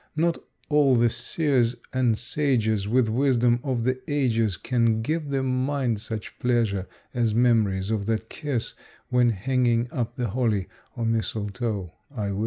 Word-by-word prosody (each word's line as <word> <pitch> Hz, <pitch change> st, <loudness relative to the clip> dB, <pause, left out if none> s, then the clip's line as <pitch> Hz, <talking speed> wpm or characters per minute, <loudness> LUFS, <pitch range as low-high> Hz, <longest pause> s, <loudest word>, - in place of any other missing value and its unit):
Not 165 Hz, +2 st, +1 dB, 0.3 s
all 145 Hz, -3 st, +4 dB
the 120 Hz, -1 st, +3 dB
seers 125 Hz, 0 st, +1 dB, 0.2 s
and 125 Hz, -4 st, +2 dB
sages 110 Hz, -10 st, 0 dB
With 120 Hz, +2 st, +3 dB
wisdom 120 Hz, 0 st, +2 dB
of 125 Hz, -4 st, -1 dB
the 130 Hz, +1 st, 0 dB
ages 115 Hz, -9 st, +1 dB
Can 115 Hz, 0 st, +1 dB
give 155 Hz, +3 st, -2 dB
the 135 Hz, -1 st, 0 dB
mind 130 Hz, -3 st, 0 dB
such 110 Hz, -1 st, -6 dB
pleasure 115 Hz, -6 st, +1 dB, 0.3 s
as 115 Hz, -4 st, +1 dB
memories 110 Hz, -5 st, +2 dB
of 105 Hz, -2 st, -1 dB
that 110 Hz, 0 st, -1 dB
kiss 140 Hz, -5 st, -3 dB, 0.4 s
When 125 Hz, -1 st, +4 dB
hanging 120 Hz, +2 st, +1 dB
up 120 Hz, -1 st, -3 dB
the 120 Hz, -3 st, -2 dB
holly 105 Hz, -4 st, 0 dB, 0.3 s
or 115 Hz, -, -1 dB
mistletoe, 110 Hz, -4 st, -2 dB, 0.2 s
I 105 Hz, -8 st, -3 dB
wis. 100 Hz, -, -3 dB
120 Hz, 150 wpm, -25 LUFS, 110-130 Hz, 0.4 s, all